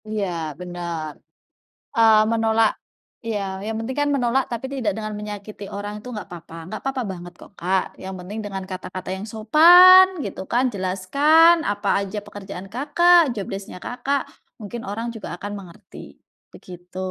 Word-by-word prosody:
Iya, 215 -2 -2 0.3
benar. 170 -3 -5 0.8
Eee, 225 -2 +6
menolak 225 -1 +3 0.5
iya, 220 -3 -2 0.2
yang 220 +1 -3
penting 225 +4 -5
kan 290 - +1
menolak 260 0 +1
tapi 235 +2 -4
tidak 245 -6 -1
dengan 215 -1 -4
menyakiti 205 0 -8
orang 205 +1 -5
itu 250 - -12
gak 205 - -6
papa, 170 -1 -11 0.2
gak 215 - -5
papa 270 -1 -1
banget 175 -1 -9
kok - - -14
Kak, 185 +2 +1 0.2
yang 190 0 -6
penting 195 +5 -7
dengan 195 -2 -5
kata-kata 185 0 -7
yang 190 +2 -6
sopan 350 +12 +8 0.2
gitu - - -6
kan. 245 +2 +2
Jelaskan 280 - +4
apa 205 0 -3
aja 200 +1 -5
pekerjaan 195 -2 -9
Kakak, 345 +7 +5 0.2
job 200 - -3
desc-nya 195 -1 -7
Kakak, 270 +3 -1 0.4
mungkin 225 +2 -7
orang 225 +3 -4
juga 225 - -8
akan 205 +3 -6
mengerti, 180 -4 -13 0.4
begitu. 180 0 -12
215 Hz, 155 wpm, -22 LUFS, 190-245 Hz, 0.8 s, sopan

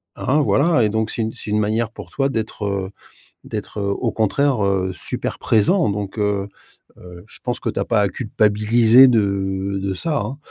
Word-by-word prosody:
Hein? 140 +4 0
Voilà 140 +4 +3
et 105 - +2
donc 110 +1 -1
c'est - - -3
une 110 0 -2
c'est 105 - -7
une 105 - +2
manière 110 +2 0
pour - - -11
toi 135 0 -1
d'être, 110 -3 -4
heu, 100 -2 -2 0.6
d'être, - - -6
heu, 100 - -1
au 110 +4 -1
contraire, 120 +2 +1
heu, 95 -1 0
super - - -3
présent 155 - +2
donc, 100 +1 -5
heu, 105 -1 0 0.5
heu, 90 0 -12
je - - -14
pense 125 -1 -2
que - - -3
tu - - -3
as - - -2
pas 115 -3 +1
à 100 - +2
culpabiliser 110 +3 +4
de 100 -3 0
de 95 -1 -2
ça, 145 - -1
hein. 125 +7 -4
105 Hz, 200 wpm, -20 LUFS, 100-120 Hz, 0.6 s, culpabiliser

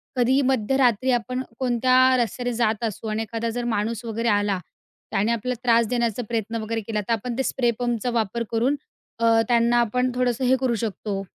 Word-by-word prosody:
कधीही 255 +2 +3
मध्यरात्री 255 -1 +2
आपण 250 +1 -1 0.2
कोणत्या 255 0 +2 0.2
रस्त्याने 245 +1 -1
जात 225 -1 0
असू 220 +1 -5
आणि 215 +1 -1
एखादा 230 +1 -3
जर 245 +1 -3
माणूस 225 0 -1
वगैरे 230 +1 -2
आला. 205 -2 +1 0.5
त्याने 210 +4 +1
आपला 235 +2 -1
त्रास 235 -2 +4
देण्याचा 235 -1 -1
प्रयत्न 225 -1 -2
वगैरे 225 +1 -3
केला 215 0 -3
तर, 220 +3 -1
आपण 235 +2 -3
ते 265 - +1
स्प्रे 240 -2 +1
पंपचा 240 -1 -1
वापर 230 0 -1
करून 240 +5 +1 0.4
अ, 230 -1 +4
त्यांना 235 0 +3
आपण 250 +2 +1
थोडंसं 250 0 0
हे 260 - +4
करू 250 -3 +1
शकतो, 205 -2 -3
235 Hz, 180 wpm, -24 LUFS, 220-245 Hz, 0.5 s, त्रास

